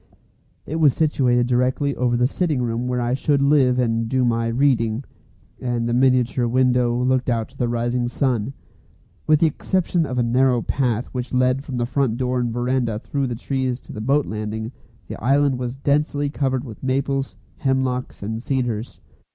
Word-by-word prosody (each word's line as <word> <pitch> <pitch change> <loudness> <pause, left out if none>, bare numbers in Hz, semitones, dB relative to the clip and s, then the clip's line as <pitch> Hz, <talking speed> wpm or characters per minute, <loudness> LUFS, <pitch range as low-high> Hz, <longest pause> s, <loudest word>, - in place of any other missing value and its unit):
It 160 - -3
was 150 -5 +4
situated 125 -6 +2
directly 130 +3 +1
over 120 -1 +1
the 125 - +3
sitting 145 -1 0
room 120 +1 -2
where 125 0 -1
I 120 0 0
should 140 +2 +1
live 140 -3 +3
and 115 -2 0
do 130 0 +2
my 115 -1 +1
"reading," 115 -1 +1 0.6
and 120 -2 -1
the 120 - 0
miniature 125 -1 +2
window 125 -1 +2
looked 130 +1 +1
out 115 -2 -1
to - - -21
the 120 - +1
rising 120 +1 -1
sun. 125 -2 -1 0.7
With 155 -1 +4
the - - +6
exception 170 +1 0
of 125 - -4
a 120 - +2
narrow 125 0 +2
path 125 -3 0
which 125 0 -4
led 130 +1 +2
from 135 -4 -5
the 120 - 0
front 125 -2 0
door 125 0 0
and 120 -1 -1
verandah 120 -2 0
through 135 +4 -2
the 120 - -3
trees 130 0 -2
to - - -11
the 105 - -6
boat 140 +5 +2
landing, 110 +1 -4 0.4
the - - -8
island 135 0 +2
was 125 0 -3
densely 145 +1 0
covered 130 -3 -1
with 115 -6 -10
maples, 135 +1 -1 0.2
hemlocks, 130 -4 -1
and 110 +2 -4
cedars. 120 -4 -3
125 Hz, 180 wpm, -22 LUFS, 120-135 Hz, 0.7 s, the